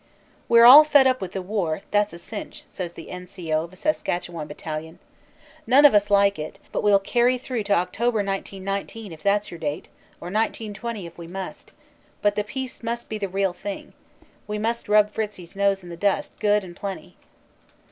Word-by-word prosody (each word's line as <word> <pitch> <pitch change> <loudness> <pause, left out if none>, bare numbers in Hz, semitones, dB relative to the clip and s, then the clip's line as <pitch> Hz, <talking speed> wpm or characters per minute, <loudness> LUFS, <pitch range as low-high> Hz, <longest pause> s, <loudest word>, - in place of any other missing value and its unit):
"We 235 - +6
re 235 - +9
all 285 +5 +12
fed 290 -3 +5
up 255 -1 +2
with 185 -2 -5
the 190 - -4
war, 180 -4 -2
that 205 0 +3
s - - -18
a - - -8
cinch," 205 +5 -8
says 175 -3 -6
the 165 - -10
N. 180 0 -8
C. 175 -4 -6
O. 155 +1 +1
of 170 - -14
a - - -13
Saskatchewan 175 - -2
battalion. 155 +2 -6 0.7
"None 270 +5 +6
of 290 - +8
us 205 0 +3
like 200 -2 +4
it, 155 +1 -6
but - - -1
we 210 - +3
ll 200 - +7
carry 240 +5 +2
through 250 -2 -4
to 200 - +2
October, 215 +5 0
1919 195 +1 -4
if 160 -1 -11
that 200 +2 +2
s - - -10
your 170 - -8
date 150 -2 -4 0.3
or 175 - -7
1920 215 0 -3
if 170 0 -12
we 170 - -8
must; 190 +2 -8 0.5
but 205 0 +3
the 210 - -1
peace 260 +4 -6
must 235 0 -4
be 215 - -4
the 200 -2 -3
real 195 0 0
thing. 200 +2 -7 0.5
We 210 0 -3
must 230 +1 -2
rub 210 0 +5
Fritzie 210 -4 -4
s 170 +3 -16
nose 195 -1 +1
in 175 - -10
the 170 - -7
dust 200 +2 0
good 210 -1 +2
and 175 -2 -10
plenty." 195 0 -7
200 Hz, 215 wpm, -24 LUFS, 180-220 Hz, 0.7 s, all